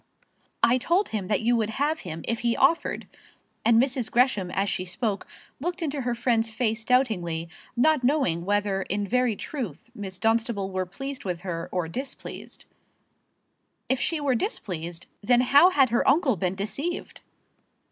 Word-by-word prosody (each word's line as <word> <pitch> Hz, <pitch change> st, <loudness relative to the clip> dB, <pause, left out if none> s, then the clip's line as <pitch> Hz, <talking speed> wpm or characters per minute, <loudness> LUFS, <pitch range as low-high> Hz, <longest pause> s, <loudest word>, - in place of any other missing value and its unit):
"I 250 Hz, +2 st, +5 dB
told 350 Hz, +10 st, +1 dB
him 205 Hz, -4 st, -3 dB
that 210 Hz, +2 st, 0 dB
you 240 Hz, +2 st, +3 dB
would 220 Hz, -2 st, 0 dB
have 290 Hz, +7 st, 0 dB
him 165 Hz, -3 st, -7 dB
if 230 Hz, 0 st, +1 dB
he 235 Hz, -1 st, +1 dB
offered." 300 Hz, +5 st, +2 dB, 0.6 s
And 225 Hz, 0 st, +5 dB
Mrs. 255 Hz, -2 st, 0 dB
Gresham, 240 Hz, -7 st, +2 dB
as 195 Hz, +2 st, 0 dB
she 185 Hz, -, -1 dB
spoke, 195 Hz, +3 st, -3 dB, 0.3 s
looked 350 Hz, +4 st, -3 dB
into 285 Hz, -3 st, -2 dB
her 245 Hz, -1 st, -1 dB
friend's 230 Hz, -1 st, +1 dB
face 225 Hz, 0 st, -1 dB
doubtingly, 185 Hz, -11 st, +1 dB, 0.3 s
not 305 Hz, +2 st, +3 dB
knowing 245 Hz, -, +2 dB
whether 205 Hz, 0 st, 0 dB
in 200 Hz, +2 st, -2 dB
very 250 Hz, 0 st, +2 dB
truth 230 Hz, -, -6 dB
Miss 195 Hz, -5 st, -7 dB
Dunstable 225 Hz, -2 st, 0 dB
were 185 Hz, -1 st, -2 dB
pleased 270 Hz, +8 st, -6 dB
with 180 Hz, -3 st, -3 dB
her 170 Hz, -3 st, -4 dB
or 180 Hz, -3 st, -1 dB
displeased. 260 Hz, -, -7 dB, 1.2 s
If 260 Hz, -, +2 dB
she 330 Hz, -, 0 dB
were 285 Hz, -3 st, +1 dB
displeased, 175 Hz, -, -3 dB, 0.2 s
then 240 Hz, +3 st, +4 dB
how 280 Hz, +7 st, +7 dB
had 270 Hz, -9 st, +3 dB
her 240 Hz, -, +2 dB
uncle 275 Hz, -3 st, +3 dB
been 180 Hz, +1 st, -1 dB
deceived! 215 Hz, -, -4 dB
230 Hz, 160 wpm, -26 LUFS, 195-265 Hz, 1.2 s, how